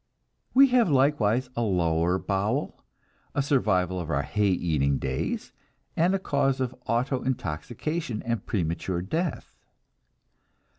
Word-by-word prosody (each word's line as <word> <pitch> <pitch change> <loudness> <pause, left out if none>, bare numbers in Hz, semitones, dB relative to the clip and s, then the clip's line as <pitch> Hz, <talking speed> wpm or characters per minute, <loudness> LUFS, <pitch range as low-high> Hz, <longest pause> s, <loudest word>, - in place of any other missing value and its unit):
We 275 +1 +8
have 245 -6 +4
likewise 130 -4 +2
a 120 - -1
lower 90 -4 +1
bowel, 100 +9 -2 0.5
a 140 - +2
survival 95 - +1
of 85 -2 -5
our 70 -2 0
hay 105 +6 0
eating 75 -7 +1
days, - - -3 0.4
and 175 +4 +3
a - - +2
cause 140 -6 0
of 130 -1 -1
autointoxication 125 - -2
and 115 -1 -1
premature 85 -1 -2
death. 160 - -3
115 Hz, 115 wpm, -26 LUFS, 90-140 Hz, 0.5 s, We